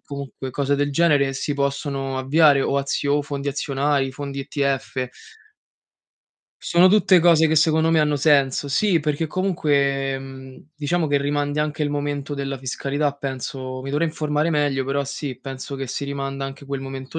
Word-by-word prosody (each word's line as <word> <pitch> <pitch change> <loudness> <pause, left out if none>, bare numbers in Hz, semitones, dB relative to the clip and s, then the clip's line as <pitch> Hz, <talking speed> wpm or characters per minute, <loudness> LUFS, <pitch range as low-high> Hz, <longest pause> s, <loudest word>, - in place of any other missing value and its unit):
comunque 140 -2 -7
cose 140 +2 0
del 145 0 0
genere 140 -3 +3
si 145 - -2
possono 140 -1 -2
avviare 140 +1 +4
o 140 - +1
azio 140 +1 0
fondi 140 -1 -4
azionari, 140 0 0
fondi 140 +1 -6
ETF. 135 -2 -2 1.5
Sono 175 +1 +4
tutte 195 -2 +5
cose 165 -2 +5
che 160 - +1
secondo 160 +1 +3
me 165 - +4
hanno 150 -1 +2
senso. 140 -1 +2
Sì, 175 +4 +2
perché 150 +2 -1
comunque, 140 -7 0
mhmm, 130 -1 -11
diciamo 155 +3 0
che 145 0 +2
rimandi 145 +1 -1
anche 150 +1 -1
il 145 - 0
momento 145 0 -3
della 140 -1 -3
fiscalità, 140 +3 -2
penso. 130 -1 -5
Mi 135 - -5
dovrei 150 +4 +1
informare 150 0 -1
meglio, 145 -4 +1
però 140 +1 -1
sì, 140 -2 -5
penso 135 +1 -7
che 135 0 -4
si 140 - -3
rimanda 135 -1 -4
anche 135 +1 -8
quel 140 -1 -4
momento 135 +3 -6
140 Hz, 165 wpm, -22 LUFS, 135-150 Hz, 1.5 s, tutte